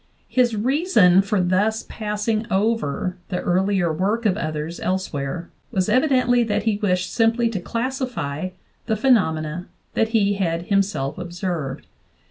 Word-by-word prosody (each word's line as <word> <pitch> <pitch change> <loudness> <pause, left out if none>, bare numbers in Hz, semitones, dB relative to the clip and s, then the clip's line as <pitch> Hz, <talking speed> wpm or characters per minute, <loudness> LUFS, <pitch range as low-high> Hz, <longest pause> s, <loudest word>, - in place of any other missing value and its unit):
His 245 -3 +2
reason 220 - +4
for 200 +1 0
thus 195 +5 +1
passing 215 +1 -2
over 190 -4 0
the 180 -2 -1
earlier 185 -2 +1
work 205 +8 0
of 195 -4 +3
others 155 -2 -4
elsewhere 170 -3 -3 0.2
was 190 -3 0
evidently 255 -1 +3
that 210 -2 -1
he 215 -2 +1
wished 185 -3 0
simply 230 0 +2
to 215 -4 -3
classify 230 - -3 0.4
the 220 - +1
phenomena 175 - +1 0.3
that 225 - +2
he 210 -3 +2
had 170 -4 -1
himself 195 -9 0
observed. 175 -5 -4
200 Hz, 130 wpm, -22 LUFS, 175-225 Hz, 0.4 s, reason